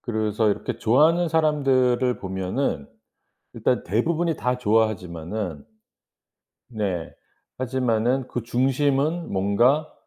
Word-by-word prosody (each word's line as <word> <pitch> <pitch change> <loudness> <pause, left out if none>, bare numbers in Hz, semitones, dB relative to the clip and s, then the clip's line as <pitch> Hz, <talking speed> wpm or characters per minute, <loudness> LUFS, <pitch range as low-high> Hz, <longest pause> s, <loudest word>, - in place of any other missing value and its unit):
그래서 110 -1 0
이렇게 100 - -3
좋아하는 160 +9 +3
사람들을 135 -6 +2
보면은 95 - -3 0.7
일단 - - 0
대부분이 160 - 0
다 125 0 -1
좋아하지만은 100 - -1 1.0
네. 95 -8 -3 0.4
하지만은 125 0 0
그 120 - -4
중심은 135 +6 0
뭔가 120 +11 +2
120 Hz, 245 characters per minute, -24 LUFS, 105-135 Hz, 1.0 s, 좋아하는